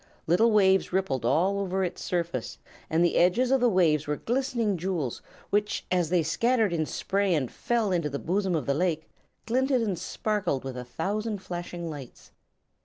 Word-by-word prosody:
Little 190 +8 +4
waves 195 -3 +4
rippled 180 -10 -1
all 180 +10 +2
over 190 -1 -1
its 180 - -4
surface, 170 -9 -2 0.3
and 165 +2 +3
the 175 - +1
edges 230 +9 +3
of 270 -1 +3
the 245 - +5
waves 160 -7 +2
were 150 - 0
glistening 235 - -1
jewels 170 -8 -3 0.3
which, 210 +1 0
as 175 -3 +1
they 175 -2 +2
scattered 225 +5 +1
in 160 -2 0
spray 195 -2 0
and 135 -5 -1
fell 230 -4 0
into 170 -4 0
the 140 - -3
bosom 185 +3 0
of 150 -6 -1
the 140 - +1
lake, 160 0 -1 0.4
glinted 255 +2 +1
and 195 -6 -2
sparkled 210 -11 -2
with 135 -1 -5
a 125 - -5
thousand 200 - -3
flashing 175 -1 -5
lights. 145 -6 -9
180 Hz, 180 wpm, -27 LUFS, 160-210 Hz, 0.4 s, the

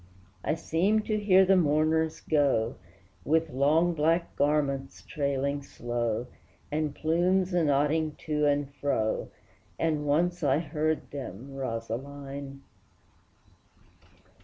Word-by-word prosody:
I 155 - 0
seem 190 +7 +1
to 215 0 -1
hear 190 -2 +5
the 195 +1 +5
mourners 155 -1 +2
go, 140 -7 +2 0.5
With 160 +1 +1
long 155 +6 +3
black 165 +2 +1
garments 140 -2 0
trailing 140 -1 -1
slow, 120 -3 -3 0.5
And 150 -1 -1
plumes 180 +3 +1
anodding 155 -1 +2
to 150 -1 +1
and 145 -1 0
fro, 140 -7 -1 0.5
As 165 -1 +2
once 170 +5 +1
I 140 -2 +3
heard 155 0 -2
them, 135 -1 -7
Rosaline! 135 +3 -5
150 Hz, 105 wpm, -28 LUFS, 140-160 Hz, 0.5 s, hear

